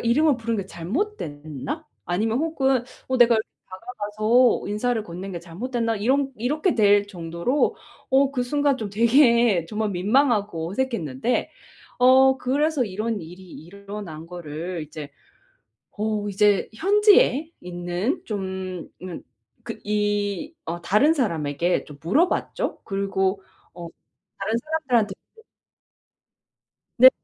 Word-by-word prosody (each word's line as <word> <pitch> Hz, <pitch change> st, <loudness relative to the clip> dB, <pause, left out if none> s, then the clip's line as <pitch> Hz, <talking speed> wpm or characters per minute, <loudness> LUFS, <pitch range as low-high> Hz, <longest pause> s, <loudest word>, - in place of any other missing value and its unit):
이름을 275 Hz, +4 st, +3 dB
부른 230 Hz, -1 st, -2 dB
게 195 Hz, -, -4 dB
잘못됐나? 180 Hz, -, -4 dB, 0.2 s
아니면 220 Hz, +7 st, 0 dB
혹은 270 Hz, -5 st, +1 dB, 0.2 s
어 260 Hz, -, +1 dB
내가 235 Hz, -1 st, +6 dB, 0.3 s
다가가서 215 Hz, +4 st, +1 dB
인사를 220 Hz, +2 st, 0 dB
건넨 190 Hz, 0 st, -7 dB
게 170 Hz, -, -5 dB
잘못됐나?' 230 Hz, +6 st, -2 dB
이런 270 Hz, +6 st, +1 dB
이렇게 300 Hz, -, 0 dB
될 205 Hz, -2 st, +4 dB
정도로 170 Hz, -, -1 dB, 0.3 s
어 270 Hz, +1 st, +4 dB
그 250 Hz, -, 0 dB
순간 285 Hz, +2 st, +1 dB
좀 215 Hz, -4 st, -5 dB
되게 235 Hz, -, +4 dB
정말 215 Hz, +1 st, -2 dB
민망하고 205 Hz, -, +1 dB
어색했는데 230 Hz, -, -1 dB, 0.5 s
어 260 Hz, +1 st, +6 dB
그래서 285 Hz, +1 st, +1 dB
이런 215 Hz, +1 st, -3 dB
일이 175 Hz, +3 st, -11 dB
일어난 195 Hz, -2 st, -9 dB
거를 170 Hz, 0 st, -6 dB
이제 150 Hz, -1 st, -8 dB, 0.9 s
어 210 Hz, -1 st, -1 dB
이제 205 Hz, 0 st, +2 dB
현지에 380 Hz, -, +4 dB
있는 175 Hz, -, -3 dB
좀 190 Hz, -4 st, -5 dB
음 180 Hz, -3 st, -7 dB, 0.4 s
그 230 Hz, -2 st, -6 dB
이 205 Hz, -, -1 dB
어 170 Hz, +1 st, -4 dB
다른 210 Hz, -, +3 dB
사람에게 170 Hz, -, 0 dB
좀 145 Hz, -1 st, -13 dB
물어봤죠. 300 Hz, -, 0 dB
그리고 195 Hz, -1 st, -1 dB, 0.3 s
어 175 Hz, -1 st, -8 dB, 0.5 s
다른 215 Hz, +3 st, -1 dB
사람들한테도 250 Hz, -9 st, -1 dB, 1.8 s
네. 255 Hz, +1 st, +10 dB
210 Hz, 245 characters per minute, -24 LUFS, 185-255 Hz, 1.8 s, 네